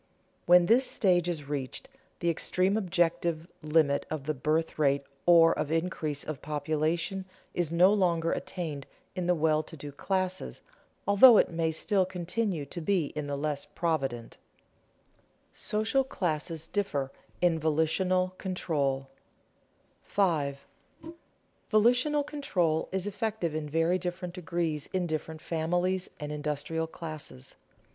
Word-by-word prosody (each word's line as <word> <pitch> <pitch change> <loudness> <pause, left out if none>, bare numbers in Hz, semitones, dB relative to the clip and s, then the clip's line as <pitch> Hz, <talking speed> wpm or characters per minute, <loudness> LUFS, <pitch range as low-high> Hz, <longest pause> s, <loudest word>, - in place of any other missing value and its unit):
When 175 0 +7
this 245 +7 +4
stage 175 -3 +2
is 155 -5 -4
reached, 140 -3 -4 0.3
the 170 - +2
extreme 185 +4 +1
objective 170 -4 0
limit 150 -2 +2
of 155 -3 -4
the 155 +2 -1
birth 155 +4 -1
rate 140 -1 +3 0.2
or 165 -1 +7
of 150 - -3
increase 160 -3 -1
of 155 -4 -6
population 155 +5 -1 0.3
is 170 -3 0
no 180 +4 +5
longer 170 -5 +2
attained 155 -7 -4 0.3
in 180 -2 -2
the 180 - +4
well 155 -1 +2
to 160 +1 -11
do 145 0 -7
classes, 185 +5 -2 0.5
although 210 +4 +8
it - - +3
may 165 -1 0
still 190 +5 +1
continue 180 -2 -2
to 170 +5 -6
be 170 -3 0
in 150 -1 -3
the 140 - -2
less 145 0 -2
provident. 135 -9 -2 1.1
[Sidenote: 215 +1 -2
Social 270 +5 +3
classes 165 - -3
differ 145 -11 -2 0.3
in 170 -2 +2
volitional 180 +4 +1
control] 140 -8 -1 0.9
5. 150 -8 0 1.1
_Volitional 250 +7 +3
control 180 - 0
is 190 0 -2
effective 205 -5 -2
in 155 -1 -3
very 165 +4 +2
different 180 0 -4
degrees 170 -4 -2
in 185 -1 +1
different 155 -1 -4
families 175 +3 0
and 150 -1 -5
industrial 150 +2 -2
classes. 155 - -8
165 Hz, 130 wpm, -29 LUFS, 155-185 Hz, 1.1 s, although